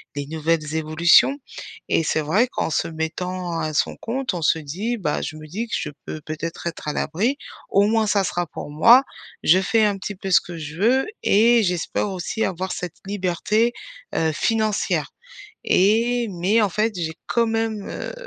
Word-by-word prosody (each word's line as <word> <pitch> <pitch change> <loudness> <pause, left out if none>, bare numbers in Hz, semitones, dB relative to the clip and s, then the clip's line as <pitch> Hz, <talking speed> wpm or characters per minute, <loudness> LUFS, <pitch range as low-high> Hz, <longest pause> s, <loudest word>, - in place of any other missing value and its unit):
les 140 -1 -4
nouvelles 160 0 -1
évolutions, 165 - +4 0.5
et 165 - +2
c'est 155 0 0
vrai 190 +12 +2
qu'en 245 - -2
se - - 0
mettant 170 +2 -3
à 155 -1 -2
son - - 0
compte, 255 -1 -3
on 175 - -4
se 160 +1 +2
dit, 195 +12 -3
bah, 160 -8 -1
je 155 - -5
me 155 - -10
dis 215 +9 -4
que - - -2
je 150 - -3 0.2
peux 155 - -6
peut-être 160 +2 -5
être 165 - -6
à 150 - -1
l'abri, 220 - 0 0.3
au 200 +1 +4
moins 220 -1 +2
ça 200 -1 +2
sera 175 -1 -2
pour 145 - -8
moi. 230 - +7 0.4
Je 180 +4 +6
fais 220 +2 +3
un 205 -1 +1
petit 195 +2 -6
peu 190 0 -5
ce - - +6
que 175 -1 -9
je 155 0 -7
veux 245 +7 +3 0.2
et 230 +3 +5
j'espère 180 +2 -1
aussi 190 +4 -3
avoir 185 0 -3
cette 180 -3 -5
liberté, 205 +4 0 0.4
heu, 160 -1 +2
financière, 215 +3 0 0.5
et 230 +5 +3
mais 190 +6 +2
en 200 - +2
fait 215 +3 0
j'ai 160 -2 -3
quand 235 -1 +2
même, 225 -2 -2
heu, - - -5
185 Hz, 185 wpm, -22 LUFS, 160-225 Hz, 0.5 s, moi